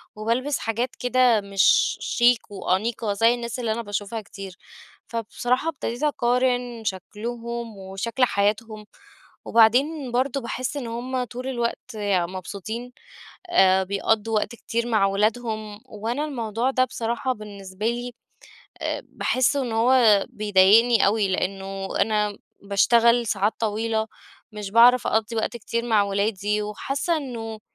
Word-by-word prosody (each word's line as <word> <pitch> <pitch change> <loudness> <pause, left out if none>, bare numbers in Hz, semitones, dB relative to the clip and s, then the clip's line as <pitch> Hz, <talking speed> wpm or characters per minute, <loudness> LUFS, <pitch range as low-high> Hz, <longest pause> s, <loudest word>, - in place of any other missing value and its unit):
وبالبس 235 +7 -1
حاجات 235 +3 -2
كده 250 -3 +3
مش 200 - +3
شيك 240 -2 +2
وأنيقة 205 +3 -1
زي 225 +4 +4
الناس 235 0 -5
اللي 230 -3 -1
أنا 230 +2 -2
باشوفها 205 +1 -4
كتير. 195 -2 -10 0.5
فبصراحة 240 +5 -1
ابتديت 265 -4 -5
أقارن 245 -3 0
شكلهم 230 +3 -5
وشكل 195 +6 -3
حياتهم، 215 0 -1 0.6
وبعدين 255 +5 +3
برضه 260 +2 0
باحس 255 +3 -4
إن 255 -4 -4
هم 250 +2 -3
طول 250 +2 -7
الوقت 240 -1 -3
يعني 200 -5 0
مبسوطين، 205 +6 -6 0.6
آآ، 190 - +4
بيقضُّوا 210 +3 0
وقت 215 +2 0
كتير 235 0 -3
مع 215 -4 +3
ولادهم، 215 +1 -1
وأنا 230 +7 -3
الموضوع 235 -4 -2
ده 255 -1 +2
بصراحة 235 +1 -2
بالنسبة 205 -2 -7
لي 240 +1 -2 0.7
آآ، - - -2
باحس 255 +3 0
إن 255 -5 -1
هو 225 -3 +4
بيضايقني 215 +1 +4
أوي، 205 0 +2
لأنه 195 +1 -3
أنا 210 -1 +1 0.2
باشتغل 235 +4 +3
ساعات 205 0 0
طويلة، 220 0 -1 0.5
مش 210 -2 -6
باعرف 240 +3 +6
أقضِّي 220 +1 0
وقت 225 +2 -1
كتير 235 +1 -3
مع 220 -3 +4
ولادي، 205 +1 -1
وحاسة 275 +10 -2
إنه 230 -6 -6
225 Hz, 130 wpm, -24 LUFS, 205-245 Hz, 0.7 s, باعرف